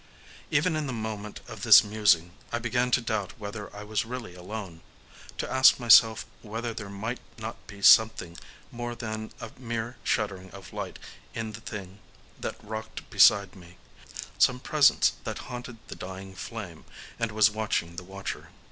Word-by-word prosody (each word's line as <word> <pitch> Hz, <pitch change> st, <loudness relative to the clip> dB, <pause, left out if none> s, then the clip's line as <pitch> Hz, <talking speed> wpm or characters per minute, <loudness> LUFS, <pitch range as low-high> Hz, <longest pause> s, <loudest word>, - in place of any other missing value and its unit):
Even 155 Hz, +3 st, +2 dB
in 155 Hz, -2 st, -2 dB
the 130 Hz, -, -3 dB
moment 110 Hz, -2 st, -5 dB
of -, -, -9 dB
this -, -, +9 dB
musing 100 Hz, -5 st, +2 dB, 0.2 s
I 120 Hz, -, 0 dB
began 125 Hz, +2 st, 0 dB
to 125 Hz, -, +3 dB
doubt 110 Hz, 0 st, -3 dB
whether 105 Hz, -1 st, -7 dB
I 105 Hz, -, -7 dB
was 105 Hz, 0 st, -1 dB
really 120 Hz, -4 st, -7 dB
alone,—to 90 Hz, -2 st, -9 dB
ask 130 Hz, 0 st, +6 dB
myself 115 Hz, -2 st, +6 dB, 0.2 s
whether 115 Hz, +2 st, -4 dB
there 110 Hz, -3 st, -7 dB
might 110 Hz, +5 st, -4 dB, 0.2 s
not 110 Hz, 0 st, -8 dB
be 100 Hz, -1 st, -11 dB
something 110 Hz, -6 st, +6 dB, 0.4 s
more 120 Hz, 0 st, -5 dB
than 110 Hz, -2 st, -5 dB
a 110 Hz, -, -7 dB
mere 120 Hz, 0 st, -4 dB
shuddering 95 Hz, -3 st, -1 dB
of 95 Hz, -1 st, -11 dB
light -, -, -5 dB, 0.4 s
in 115 Hz, -1 st, -3 dB
the 115 Hz, -, -9 dB
thing 100 Hz, -3 st, -8 dB, 0.4 s
that -, -, -4 dB
rocked 110 Hz, +1 st, -7 dB
beside 100 Hz, -2 st, +5 dB
me: 90 Hz, -1 st, -15 dB, 0.6 s
some 125 Hz, 0 st, +4 dB
presence 145 Hz, +2 st, +4 dB
that -, -, -4 dB
haunted 120 Hz, -1 st, -7 dB
the -, -, -7 dB
dying 95 Hz, +1 st, -8 dB
flame, 95 Hz, -4 st, -8 dB, 0.4 s
and 115 Hz, -1 st, -1 dB
was 110 Hz, 0 st, +5 dB
watching 105 Hz, -6 st, -2 dB
the 90 Hz, -, -6 dB
watcher. 95 Hz, +1 st, -7 dB
110 Hz, 160 wpm, -27 LUFS, 100-115 Hz, 0.6 s, this